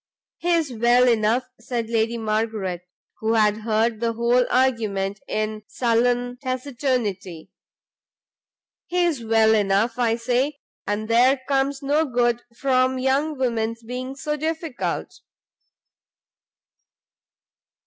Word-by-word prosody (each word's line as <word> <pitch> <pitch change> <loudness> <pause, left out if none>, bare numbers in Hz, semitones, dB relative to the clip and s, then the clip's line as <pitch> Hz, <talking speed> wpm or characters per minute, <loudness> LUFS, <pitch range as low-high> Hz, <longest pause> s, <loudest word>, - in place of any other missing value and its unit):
"He 350 - -2
is 320 -6 0
well 240 +2 +4
enough," 230 +1 +2 0.2
said 235 0 -3
Lady 230 0 0
Margaret, 215 -5 -2 0.3
who 220 +1 0
had 210 -2 +3
heard 220 +1 0
the 230 0 0
whole 240 +2 +2
argument 215 -6 0
in 215 0 -2
sullen 245 +1 0
taciturnity, 250 - -3 1.4
"he 355 0 +1
is 300 -9 -1
well 220 0 +4
enough, 210 +3 +1
I 230 -2 +2
say; 250 +5 0 0.3
and 205 +1 -2
there 250 +4 +4
comes 275 0 0
no 290 +3 +2
good 240 -3 +1 0.2
from 260 -1 +2
young 275 +4 0
women's 230 -2 -1
being 255 +3 -5
so 300 +2 -3
difficult." 315 -3 -3
240 Hz, 110 wpm, -23 LUFS, 220-260 Hz, 1.4 s, well